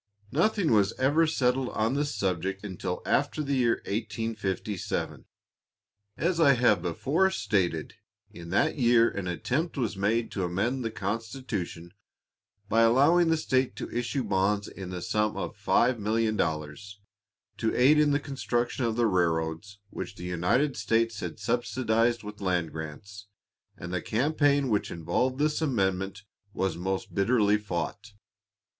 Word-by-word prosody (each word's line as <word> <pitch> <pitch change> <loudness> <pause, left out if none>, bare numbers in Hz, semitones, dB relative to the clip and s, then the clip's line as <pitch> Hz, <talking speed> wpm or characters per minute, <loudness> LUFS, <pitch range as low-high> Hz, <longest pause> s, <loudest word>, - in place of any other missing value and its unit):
Nothing 180 - +2
was 105 -1 +3
ever 150 +5 +2
settled 130 -4 +1
on 110 +3 0
this 145 +1 -1
subject 95 +1 -2
until 95 -4 -4
after 155 - +1
the 140 -1 -2
year 120 -3 +1
1857. 110 -2 -3 0.9
As 170 +1 0
I 145 -4 +6
have 120 -7 +3
before 140 - +1
stated, 90 - -1 0.4
in 85 0 -10
that 105 - +1
year 120 -1 +4
an 100 -2 -4
attempt 140 - -2
was 115 -6 -1
made 110 +4 0
to 95 - -2
amend 105 +9 -1
the 115 - -1
constitution 105 -4 -4 0.7
by 115 +2 +3
allowing 140 +9 +5
the 165 - +3
state 130 -4 0
to - - -6
issue 120 +2 -1
bonds 100 0 +1
in 95 -2 -8
the 90 -1 -5
sum 105 0 0
of - - -4
$5,000,000 105 - 0 0.7
to 115 - 0
aid 140 +5 +5
in 150 -1 +4
the 145 0 +2
construction 130 -3 -2
of 115 -1 0
the 120 0 +2
railroads 85 0 0
which - - -6
the - - -10
United 90 - +1
States 115 -1 0
had - - -5
subsidized 115 +1 0
with 105 0 -9
land 90 -4 0
grants, 100 +7 -8 0.5
and 90 +1 -7
the 90 - -1
campaign 140 +2 +1
which 105 -2 0
involved 85 +11 -1
this 150 +2 +1
amendment 95 -8 -1 0.3
was 95 -2 0
most 95 +2 -3
bitterly 105 0 +3
fought. 100 +1 -4
110 Hz, 140 wpm, -28 LUFS, 95-130 Hz, 0.9 s, I